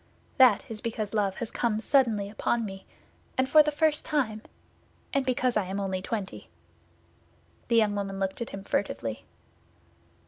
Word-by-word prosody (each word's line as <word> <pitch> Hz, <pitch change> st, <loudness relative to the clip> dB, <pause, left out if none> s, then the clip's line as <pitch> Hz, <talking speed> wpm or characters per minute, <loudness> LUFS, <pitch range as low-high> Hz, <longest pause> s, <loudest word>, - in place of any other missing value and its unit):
"That 245 Hz, -5 st, +6 dB
is 220 Hz, -2 st, -3 dB
because 220 Hz, -3 st, -3 dB
love 200 Hz, -3 st, +1 dB
has 230 Hz, +1 st, -5 dB
come 225 Hz, -3 st, 0 dB
suddenly 225 Hz, -5 st, +2 dB
upon 220 Hz, +2 st, -1 dB
me, 195 Hz, -1 st, -8 dB, 0.5 s
and 260 Hz, 0 st, +2 dB
for 305 Hz, +3 st, +7 dB
the 300 Hz, 0 st, +1 dB
first 305 Hz, 0 st, +2 dB
time; 255 Hz, -9 st, -1 dB, 0.7 s
and 275 Hz, -1 st, +1 dB
because 255 Hz, -1 st, +1 dB
I 210 Hz, -, +1 dB
am 190 Hz, +2 st, -4 dB
only 190 Hz, -1 st, -2 dB
twenty." 200 Hz, -1 st, -5 dB, 1.2 s
The 235 Hz, -, +1 dB
young 215 Hz, -2 st, +4 dB
woman 195 Hz, -1 st, -3 dB
looked 195 Hz, +3 st, -2 dB
at 235 Hz, -, -3 dB
him 195 Hz, 0 st, -7 dB
furtively. 115 Hz, -, -2 dB
215 Hz, 160 wpm, -28 LUFS, 195-255 Hz, 1.2 s, for